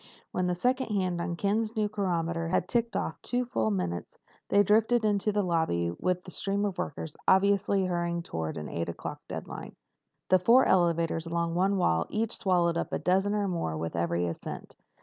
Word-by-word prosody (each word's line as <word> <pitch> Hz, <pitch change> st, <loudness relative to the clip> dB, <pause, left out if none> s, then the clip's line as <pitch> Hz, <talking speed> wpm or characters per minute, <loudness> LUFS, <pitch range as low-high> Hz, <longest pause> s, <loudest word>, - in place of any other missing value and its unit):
When 180 Hz, 0 st, 0 dB
the 180 Hz, -, 0 dB
second 255 Hz, +7 st, +1 dB
hand 185 Hz, -5 st, -1 dB
on 170 Hz, 0 st, -2 dB
Ken's 215 Hz, +4 st, 0 dB
new 215 Hz, -1 st, +1 dB
chronometer 170 Hz, -5 st, -1 dB
had 170 Hz, -, 0 dB
ticked 235 Hz, -1 st, 0 dB
off -, -, -2 dB
two 250 Hz, 0 st, -1 dB
full 115 Hz, -, 0 dB
minutes, 90 Hz, -4 st, -3 dB, 0.3 s
they 205 Hz, 0 st, +5 dB
drifted 220 Hz, +3 st, +3 dB
into 210 Hz, 0 st, +2 dB
the 205 Hz, 0 st, +1 dB
lobby 160 Hz, -, 0 dB
with 180 Hz, -, -1 dB
the 180 Hz, -, -10 dB
stream 200 Hz, +3 st, -1 dB
of 190 Hz, -3 st, -3 dB
workers 160 Hz, -3 st, -4 dB
obviously 200 Hz, 0 st, +3 dB
hurrying 170 Hz, -1 st, -1 dB
toward 80 Hz, -, -4 dB
an 75 Hz, -, -5 dB
eight 85 Hz, 0 st, -3 dB
o'clock 85 Hz, -, -6 dB
deadline. -, -, -7 dB, 0.5 s
The 185 Hz, -, +6 dB
four 235 Hz, +8 st, +5 dB
elevators 170 Hz, -2 st, +2 dB
along 170 Hz, 0 st, -1 dB
one 190 Hz, +3 st, +2 dB
wall 85 Hz, -, +2 dB
each 225 Hz, +1 st, -1 dB
swallowed 175 Hz, -3 st, +2 dB
up -, -, -3 dB
a -, -, 0 dB
dozen 195 Hz, +3 st, +1 dB
or 205 Hz, -1 st, 0 dB
more 165 Hz, -, -2 dB
with 80 Hz, +1 st, -4 dB
every 85 Hz, +1 st, 0 dB
ascent. 85 Hz, -, -6 dB
180 Hz, 190 wpm, -29 LUFS, 165-205 Hz, 0.5 s, The